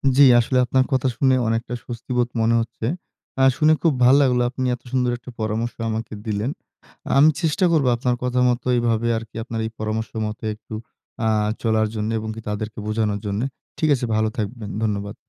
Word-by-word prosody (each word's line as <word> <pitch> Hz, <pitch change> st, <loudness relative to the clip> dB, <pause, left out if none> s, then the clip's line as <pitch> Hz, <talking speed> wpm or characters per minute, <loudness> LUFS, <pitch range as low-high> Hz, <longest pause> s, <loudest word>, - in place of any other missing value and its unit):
জি, 140 Hz, -, +7 dB, 0.2 s
আসলে 125 Hz, +2 st, +1 dB
আপনার 130 Hz, +1 st, +2 dB
কথা 130 Hz, 0 st, +2 dB
শুনে 130 Hz, -2 st, +4 dB
অনেকটা 115 Hz, +2 st, -1 dB
স্বস্তিবোধ 120 Hz, 0 st, -2 dB
মনে 115 Hz, +1 st, +3 dB
হচ্ছে। 115 Hz, 0 st, -6 dB, 0.6 s
আ -, -, +5 dB
শুনে 155 Hz, 0 st, +5 dB
খুব 165 Hz, -4 st, +3 dB
ভাল 125 Hz, +2 st, +7 dB
লাগলো, 125 Hz, -2 st, +3 dB
আপনি 130 Hz, 0 st, -3 dB
এত 125 Hz, -, -19 dB
সুন্দর 125 Hz, -2 st, +1 dB
একটা 125 Hz, +1 st, -11 dB
পরামর্শ 110 Hz, +2 st, -1 dB, 0.2 s
আমাকে 110 Hz, 0 st, -4 dB
দিলেন। 110 Hz, +4 st, -1 dB, 0.7 s
আমি 150 Hz, +3 st, +7 dB
চেষ্টা 165 Hz, +3 st, +2 dB
করব 150 Hz, -5 st, +3 dB
আপনার 125 Hz, 0 st, 0 dB
কথা 125 Hz, 0 st, 0 dB
মত 120 Hz, 0 st, 0 dB
এভাবে 115 Hz, -1 st, +1 dB
আরকি 115 Hz, -1 st, -9 dB
আপনার 115 Hz, -1 st, -5 dB
এই 110 Hz, -, -4 dB
পরামর্শ 110 Hz, +1 st, -2 dB, 0.2 s
মতো 105 Hz, +1 st, -6 dB
একটু 110 Hz, -, -13 dB, 0.5 s
আ -, -, +3 dB, 0.4 s
চলার 110 Hz, -1 st, +2 dB
জন্য 105 Hz, +1 st, -2 dB
এবং 110 Hz, 0 st, -5 dB
কি 115 Hz, -, -7 dB
তাদেরকে 105 Hz, +1 st, -4 dB
বোঝানোর 105 Hz, -1 st, 0 dB
জন্য। 100 Hz, +2 st, -1 dB, 0.4 s
ঠিক 155 Hz, -, +2 dB
আছে 125 Hz, -, -3 dB
ভালো 110 Hz, 0 st, +2 dB
থাকবেন। 110 Hz, 0 st, -4 dB
ধন্যবাদ। 100 Hz, -1 st, -2 dB
115 Hz, 185 wpm, -22 LUFS, 110-125 Hz, 0.7 s, জি